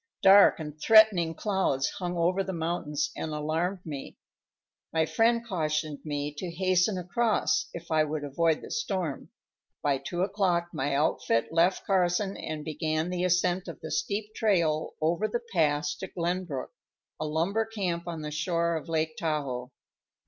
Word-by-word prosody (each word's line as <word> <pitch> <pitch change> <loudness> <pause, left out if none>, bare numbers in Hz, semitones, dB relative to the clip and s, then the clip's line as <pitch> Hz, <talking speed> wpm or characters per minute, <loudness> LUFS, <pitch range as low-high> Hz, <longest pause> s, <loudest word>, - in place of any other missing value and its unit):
Dark 195 -1 +7
and 150 -1 -7
threatening 210 -7 +6
clouds 190 -10 0
hung 175 -1 -3
over 180 +3 +2
the 190 - -4
mountains 165 -3 -2
and 160 - -4
alarmed 165 +5 -2
me. 145 -4 -7 0.7
My 160 -1 +2
friend 230 +6 +2
cautioned 155 -5 -1
me 145 -1 -3
to 180 - -4
hasten 185 +3 +1
across, 210 +6 +1
if 170 0 -9
I 155 -1 +4
would 155 0 -3
avoid 160 +3 +1
the - - -9
storm. 185 - -2 0.5
By 140 -2 +2
two 175 +5 -2
o'clock 185 -4 +1
my 140 +1 -1
outfit 140 -5 +1
left 170 +3 +2
Carson 190 +1 +1
and 155 -1 -5
began 155 +2 -1
the 180 0 -1
ascent 180 0 +1
of - - -7
the - - -6
steep 215 - -2
trail 170 -9 +1
over 170 +7 +1
the 235 +3 -3
pass 150 -3 +2
to 190 - -6
Glenbrook, 175 -5 -3 0.5
a 155 - -2
lumber 175 +9 0
camp 180 -6 -3
on 165 -2 -4
the 150 - -4
shore 170 +2 0
of 160 - -8
Lake 160 -1 0
Tahoe. 140 -6 -2
Dr. - - -25
170 Hz, 160 wpm, -28 LUFS, 155-185 Hz, 0.7 s, Dark